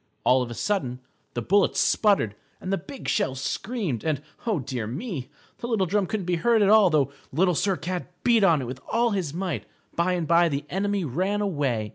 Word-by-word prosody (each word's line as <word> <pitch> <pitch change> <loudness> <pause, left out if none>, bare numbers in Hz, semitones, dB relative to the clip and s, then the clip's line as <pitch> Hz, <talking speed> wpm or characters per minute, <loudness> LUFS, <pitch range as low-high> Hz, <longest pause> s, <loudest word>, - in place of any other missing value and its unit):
All 130 +1 +4
of 125 - -3
a 120 - -6
sudden 130 - -1 0.4
the 120 - -2
bullets 200 - +3
sputtered 200 - +3 0.3
and 185 - -3
the - - +2
big 275 -2 -9
shells 130 0 0
screamed, 195 - -3
and, 155 -4 0 0.3
oh, 215 -5 +2
dear 130 -5 -4
me, 140 - -5 0.3
the 235 - -4
little 220 -5 +1
drum 195 +2 0
couldn't 210 -2 -3
be 175 -1 0
heard 225 +4 +3
at 200 - +4
all, 215 -1 +7
although 150 -6 +2 0.2
Little 180 +6 +2
Sir 190 +3 +1
Cat 180 +2 -4
beat 235 -3 +4
on 165 -8 +4
it - - -4
with 125 +1 -7
all 235 0 +2
his 185 -8 -1
might. 180 +3 -3 0.3
By 175 +2 +1
and 175 -3 -1
by 170 0 +5
the 145 0 -3
enemy 200 0 0
ran 185 +9 -1
away. 140 - -1
180 Hz, 210 wpm, -25 LUFS, 140-205 Hz, 0.4 s, all